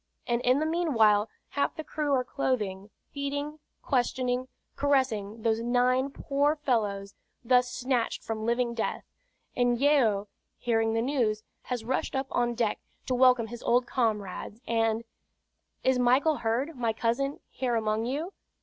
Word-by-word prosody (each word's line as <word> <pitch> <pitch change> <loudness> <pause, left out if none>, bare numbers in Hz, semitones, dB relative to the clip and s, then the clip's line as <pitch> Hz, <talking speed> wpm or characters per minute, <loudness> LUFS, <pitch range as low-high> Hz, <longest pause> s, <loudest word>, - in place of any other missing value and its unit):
And 240 0 0
in 250 +2 +3
the 310 - 0
meanwhile 225 -11 +3 0.2
half 285 - -1
the 315 - -5
crew 300 -1 -2
are 255 - +1
clothing, 210 -7 -2 0.2
feeding, 285 +1 -3 0.2
questioning, 250 0 0 0.3
caressing 230 -7 0
those 225 0 +1
nine 250 +3 +2
poor 285 +2 0
fellows 210 -9 -1 0.3
thus 250 +1 +3
snatched 250 -2 -1
from 220 -1 -4
living 235 +1 +1
death; 230 - -2 0.5
and 245 -1 +2
Yeo, 245 -8 +3 0.3
hearing 225 -2 +1
the 225 - +1
news, 235 -6 0 0.2
has 245 -3 -3
rushed 260 +2 -1
up 265 0 0
on 240 -1 +1
deck 225 -3 0 0.3
to 255 - -1
welcome 250 -2 +5
his 235 +1 -8
old 245 +1 +2
comrades, 215 -4 -2
and: 225 -1 +1 0.8
"Is 260 -1 +3
Michael 265 +5 +3
Heard, 250 +8 -1
my 235 -3 0
cousin, 240 +6 -1
here 250 -2 -1
among 220 0 0
you?" 300 +10 -3
245 Hz, 145 wpm, -28 LUFS, 225-270 Hz, 0.8 s, welcome